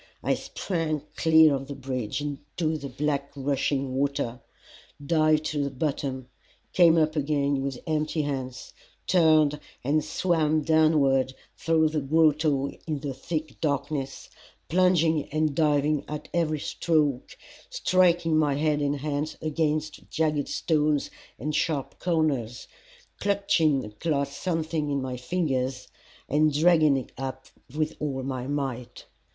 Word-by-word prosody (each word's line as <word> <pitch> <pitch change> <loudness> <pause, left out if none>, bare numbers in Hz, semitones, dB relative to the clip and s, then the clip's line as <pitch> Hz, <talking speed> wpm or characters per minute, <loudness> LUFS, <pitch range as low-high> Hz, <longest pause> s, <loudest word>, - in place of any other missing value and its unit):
I - - +2
sprang 160 -5 -3
clear 160 -2 +6
of 135 0 -3
the 140 - -6
bridge 130 -2 -3
into 150 +3 -3
the 140 -2 -6
black 140 +1 -2
rushing 135 -1 -1
water, 140 -3 -1 0.7
dived 155 0 +3
to 145 -2 -1
the 140 - -1
bottom, 135 -2 -3 0.5
came 170 -2 +6
up 155 0 +2
again 140 -2 0
with 135 -2 -3
empty 155 -1 -1
hands, 130 -3 -5 0.3
turned 155 -4 +4 0.2
and 150 +4 +1
swam 155 -4 +1
downward 145 -4 +3 0.2
through 160 -1 +2
the 155 -1 -1
grotto 150 -1 +2 0.2
in 150 -3 -2
the 140 -2 -3
thick 155 +2 -5
darkness, 140 -2 -2 0.4
plunging 165 -3 +3
and 155 0 0
diving 150 -1 +2
at 150 0 -6
every 160 -3 0
stroke, 150 -5 0 0.3
striking 175 - +2
my 150 -3 +2
head 150 0 +1
and 145 -1 -1
hands 150 +1 -3
against 155 -1 -2
jagged 150 -2 0
stones 150 -2 0 0.3
and 150 +4 -3
sharp 145 -5 -1
corners, 140 -9 -1 0.5
clutching 170 - +2
at 105 +4 -13
last 140 -4 -1
something 160 -3 -1
in 140 -1 0
my 130 -1 -4
fingers 130 -2 -2 0.4
and 155 +2 +3
dragging 155 -4 +5
it 130 - -6
up 130 0 -5 0.3
with 155 0 -1
all 135 -3 -3
my 130 -1 -4
might. 135 -4 -4
150 Hz, 130 wpm, -26 LUFS, 140-155 Hz, 0.7 s, clear